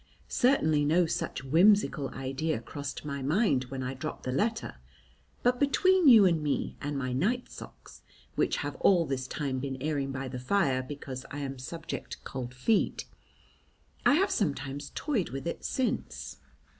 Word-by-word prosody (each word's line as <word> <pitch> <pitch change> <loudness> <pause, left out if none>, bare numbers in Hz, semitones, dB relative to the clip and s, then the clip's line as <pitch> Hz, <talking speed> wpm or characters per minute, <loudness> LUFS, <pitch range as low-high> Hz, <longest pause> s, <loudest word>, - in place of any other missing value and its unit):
Certainly 160 - +3
no 170 +4 +4
such 155 - -3
whimsical 165 0 +4
idea 135 +2 -2
crossed 140 +5 -6
my 140 -1 -4
mind 145 - +2
when 130 +1 -5
I 130 +1 -3
dropped 130 - -6
the 130 - -2
letter, 220 - -1 0.7
but 245 0 +3
between 355 +5 +4
you 225 -6 +9
and 170 -4 +3
me 150 -1 -1
and 145 0 -3
my 130 -2 -2
night 220 - 0
socks, - - -12 0.3
which - - +1
have - - -4
all 175 -4 +4
this 130 -2 -3
time 135 -2 -2
been 135 0 -4
airing 140 -1 -1
by 135 0 -4
the 125 0 -5
fire 130 -2 +1
because 130 -1 -7
I 145 - -5
am 135 -2 -5
subject 165 +6 -6
to - - -8
cold 125 -2 -6
feet, 200 - +1 1.0
I - - +5
have 390 +5 +2
sometimes 140 -5 -2
toyed 245 - -1
with 135 0 -6
it 170 - -4
since. 260 -2 -2
145 Hz, 165 wpm, -29 LUFS, 130-195 Hz, 1.0 s, you